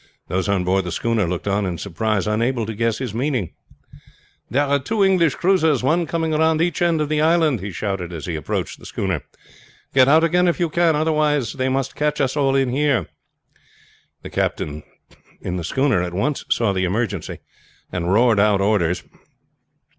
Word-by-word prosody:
Those 95 +4 -1
on 100 -2 +1
board 95 +2 +1
the 90 - -5
schooner 115 +2 0
looked 90 +3 -4
on 100 +1 +1
in 90 -3 -3
surprise, 105 +2 -1
unable 115 +2 0
to 110 - -5
guess 115 0 0
his 125 -4 -4
meaning. 125 - -2 1.0
"There 140 +6 +2
are 140 0 +1
two 205 +9 0
English 180 -6 +3
cruisers, 160 -8 +2
one 165 +5 +1
coming 165 -1 -1
round 160 +1 +2
each 170 -1 0
end 170 -3 +2
of 150 - 0
the 150 0 0
island!" 160 -5 +3
he 100 +2 -5
shouted 95 -2 -4
as 80 -4 -6
he 85 - -3
approached 75 - -4
the - - -11
schooner. 95 -6 -2 0.7
"Get 130 -1 +5
out 155 +3 +5
again 180 +2 +3
if 170 - 0
you 170 -3 0
can, 170 -1 +3
otherwise 150 -5 +1
they 130 -1 -1
must 135 0 -2
catch 150 0 -1
us 135 -1 0
all 135 -2 +2
in 135 -2 +2
here!" 135 - +1 1.1
The - - -8
captain 75 0 -2 0.6
in 90 0 -4
the 85 - -4
schooner 130 - +1
at 90 0 -4
once 140 +9 -1
saw 110 -4 +1
the 95 -1 0
emergency, 100 -1 -2 0.5
and 90 0 -2
roared 115 0 +4
out 100 -1 +3
orders. 95 -4 +1
125 Hz, 185 wpm, -21 LUFS, 100-150 Hz, 1.1 s, Get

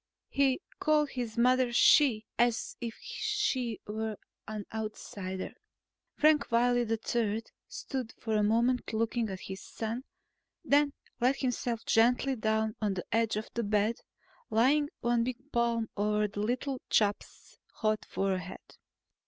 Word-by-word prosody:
He 275 +2 +2 0.2
called 300 -1 +3
his 240 -3 -4
mother 250 +1 +4
"She" 240 -2 +5
as 240 -1 +1
if 230 -2 -5
she 280 - -1
were 215 0 -3 0.3
an 210 -1 -5
outsider.... 200 -3 -5 0.6
Frank 305 -3 +3
Wiley 245 0 +3
III 225 -1 0 0.2
stood 255 -4 -5
for 220 -1 -2
a 210 - +3
moment 235 +4 +2
looking 225 0 0
at 190 -1 -6
his 190 0 -7
son, 225 +3 -4 0.6
then 285 0 +4 0.3
let 255 +3 +3
himself 245 -3 -2
gently 245 +4 +3
down 220 -1 0
on 205 -3 0
the 180 - -4
edge 225 0 +2
of 215 +1 -4
the 235 - -1
bed, 215 +1 +1 0.5
laying 285 +6 +3
one 240 -1 +2
big 255 +4 -5
palm 235 -1 +1
on 210 +1 +1
the - - -4
little 250 +5 -1
chap's 205 -1 0
hot 215 -1 0
forehead. 190 -2 -3
230 Hz, 135 wpm, -30 LUFS, 215-250 Hz, 0.6 s, She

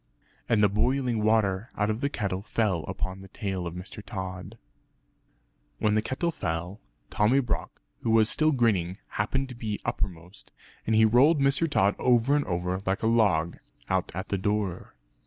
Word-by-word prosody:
And 110 -3 +3
the - - +7
boiling 120 +3 0
water 110 0 +1
out 105 +1 +1
of 110 +3 -4
the 140 - +1
kettle 95 -8 -2
fell 100 -5 0
upon 95 +1 -4
the 95 - -11
tail 95 -2 -4
of 85 - -6
Mr. 95 +3 -7
Tod. 95 +2 -6 1.2
When 105 -1 +1
the 110 - +3
kettle 130 +9 -1
fell, 90 - -4 0.3
Tommy 110 +6 +3
Brock, 120 -5 -3 0.2
who - - -2
was 110 -1 +5
still 155 +6 +2
grinning, 100 - +1
happened 135 +6 -1
to 125 - -8
be 110 -3 -4
uppermost; 90 +2 -5 0.4
and 110 - +2
he 110 0 +6
rolled 135 +8 +5
Mr. 140 +4 +2
Tod 100 -8 +2
over 125 +2 +3
and 145 - +1
over 90 +1 -2
like 95 +1 -1
a - - +2
log, 100 -8 +2 0.3
out 95 -1 0
at 95 +2 -5
the 100 - -1
door. 100 -2 -2
105 Hz, 175 wpm, -27 LUFS, 95-120 Hz, 1.2 s, the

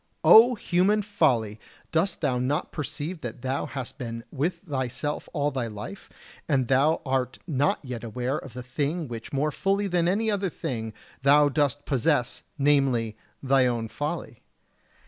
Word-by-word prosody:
O 240 +3 +8
human 205 +2 +2
folly! 125 - +1 0.3
dost 165 +5 +1
thou 130 -5 +1
not 140 +6 -1
perceive 155 +3 -5
that 120 0 -7
thou 130 +2 -1
hast 135 0 -7
been 115 -2 -5
with 160 +5 -1
thyself 140 +1 -3
all 145 -2 0
thy 130 -4 -2
life, 105 - -8 0.4
and 130 -4 +2
thou 140 +5 +3
art 130 -1 -1
not 145 -4 +1
yet 125 -4 -6
aware 125 +5 -2
of 135 - -11
the 125 - -6
thing 145 +5 -2
which 115 -2 -7
more 145 +2 0
fully 195 +6 0
than 175 -3 +1
any 215 +4 +1
other 200 -2 0
thing 110 -8 -4 0.3
thou 145 +2 +6
dost 145 -1 0
possess, 135 -2 +1 0.2
namely, 135 -6 +2 0.3
thy 135 -1 +4
own 120 -2 -1
folly? - - -4
140 Hz, 155 wpm, -26 LUFS, 125-160 Hz, 0.4 s, O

